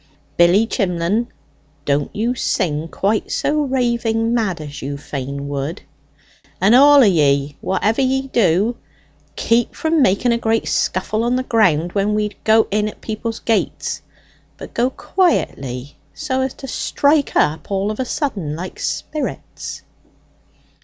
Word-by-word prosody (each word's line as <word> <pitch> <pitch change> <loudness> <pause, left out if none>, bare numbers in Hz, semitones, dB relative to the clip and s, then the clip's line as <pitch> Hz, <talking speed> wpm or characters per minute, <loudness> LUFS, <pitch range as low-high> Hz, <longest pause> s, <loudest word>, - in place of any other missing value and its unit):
Billy 175 +6 +5
Chimlen, 195 +1 0 0.6
don't 140 0 0
you 230 +4 0
sing 165 -10 -1
quite 205 +5 -1
so 300 +1 +1
raving 235 -4 0
mad 215 -8 0
as 145 -2 -8
you 140 +1 -4
fain 140 0 -5
would; 145 +6 -4 0.8
and, 200 +4 +4
all 285 +2 +8
o' - - +7
ye, 145 -7 +2
whatever 215 +6 0
ye 265 0 +1
do, 210 0 +2 0.6
keep 235 +1 +1
from 320 -1 +1
making 240 +2 +3
a 235 - +1
great 225 0 0
scuffle 215 +4 0
on 240 +1 +1
the 255 - 0
ground 180 -9 +2
when 205 +2 0
we 210 -1 0
go 220 0 +5
in 210 +1 +1
at 215 - -8
people's 225 +1 -4
gates; 225 -2 -1 0.6
but - - -10
go 245 +2 +1
quietly, 140 - -1 0.2
so 265 -4 -2
as 260 0 -2
to 270 - -9
strike 285 +3 +1
up 150 +2 +1
all 200 +1 0
of 215 - -7
a 260 - 0
sudden, 200 - -3
like 180 +3 -7
spirits." 305 - -5
215 Hz, 145 wpm, -19 LUFS, 170-245 Hz, 0.8 s, all